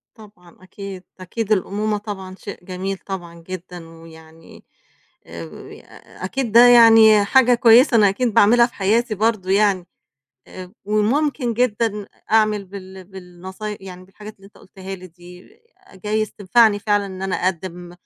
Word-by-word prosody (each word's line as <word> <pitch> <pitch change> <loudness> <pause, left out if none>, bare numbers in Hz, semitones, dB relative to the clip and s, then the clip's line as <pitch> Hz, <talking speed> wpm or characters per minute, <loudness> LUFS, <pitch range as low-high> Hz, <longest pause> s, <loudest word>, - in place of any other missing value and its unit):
طبعًا، 200 -6 -18
أكيد، 190 -1 -10 0.2
أكيد، 215 +4 -5
الأمومة 210 +2 -1
طبعًا 195 -3 -8
شيء 195 -2 -11
جميل 190 +1 -5
طبعًا 170 -4 -9
جدًا، 180 -2 -9
ويعني 165 0 -16 0.6
أو 85 -1 -9 0.2
يا - - -13
أكيد 240 +3 -3
ده 240 +2 +7
يعني 225 -3 +6
حاجة 250 +2 +4
كويسة 235 +2 +5
أنا 205 -2 +5
أكيد 225 +3 -2
باعملها 235 +3 +5
في - - -22
حياتي 215 +3 0
برضه، 215 -3 -1
يعني 195 -3 +1 0.6
آآ 185 -1 -10
ب 180 - -22
وممكن 240 +4 0
جدًا 225 -3 -1
أ - - -14 0.3
أعمل 215 -2 +2
بال 190 -1 -11
بالنصاي 190 +3 -9
يعني 185 -1 -11
بالحاجات 210 +3 -13
اللي 195 - -22
أنت 205 - -21
قُلتها 190 0 -10
لي 185 0 -12
دي 180 +1 -16 0.5
جايز 215 +3 -3
تنفَعني 210 +1 +2
فعلًا 205 -1 0
إن 190 0 -9
أنا 195 -1 -2
اقدِّم 175 -1 -4
200 Hz, 150 wpm, -20 LUFS, 185-215 Hz, 0.6 s, ده